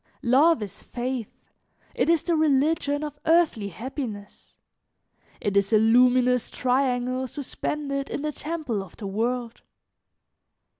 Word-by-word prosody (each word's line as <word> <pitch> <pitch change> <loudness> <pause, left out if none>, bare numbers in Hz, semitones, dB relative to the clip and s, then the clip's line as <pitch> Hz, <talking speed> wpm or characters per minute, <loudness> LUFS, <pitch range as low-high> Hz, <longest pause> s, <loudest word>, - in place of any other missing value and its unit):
Love 280 +2 +4
is 200 -2 -8
faith, 245 -2 -4 0.6
it - - 0
is 335 -2 +3
the 340 - +1
religion 295 -1 +2
of 295 -1 -6
earthly 320 -11 +3
happiness, 220 - -7 0.8
it 205 -1 -2
is 200 +1 +2
a 220 - +6
luminous 250 +2 +4
triangle 255 0 0
suspended 280 +1 -4
in 285 - -4
the 305 - -1
temple 300 -9 -3
of 195 - -12
the 215 - -7
world. 230 +4 -2
255 Hz, 120 wpm, -25 LUFS, 230-295 Hz, 0.8 s, a